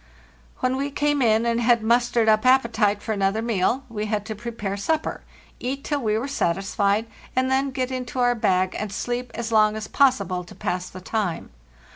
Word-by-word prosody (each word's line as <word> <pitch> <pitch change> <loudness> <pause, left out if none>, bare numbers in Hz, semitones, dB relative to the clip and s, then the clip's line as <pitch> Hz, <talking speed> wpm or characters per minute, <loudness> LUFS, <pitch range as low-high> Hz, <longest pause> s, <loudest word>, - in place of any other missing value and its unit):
When 255 +1 +1
we 280 +1 -1
came 290 0 0
in, 225 -1 +3
and 235 0 +1
had 235 -1 +3
mustered 235 0 +2
up 215 0 +4
appetite 230 -5 +3
for 220 - -3
another 200 +1 0
meal, 230 +3 +1
we 215 -3 -4
had 210 -1 -2
to 220 - -4
prepare 210 -3 -4
supper, 310 +10 -1 0.4
eat 270 +3 -3
till 295 -2 -1
we 215 -2 +1
were 245 +5 -2
satisfied, 200 -2 0 0.3
and 260 +1 +1
then 270 +1 +2
get 260 -1 -2
into 255 0 -5
our 245 -1 +3
bag 185 -5 +1
and 210 -1 -4
sleep 245 +4 -3
as 235 -1 -4
long 215 -1 +4
as 215 -1 -5
possible 255 -10 +2
to 175 - -13
pass 180 -3 -3
the 185 - -10
time. 195 -3 -3
230 Hz, 190 wpm, -24 LUFS, 210-255 Hz, 0.4 s, up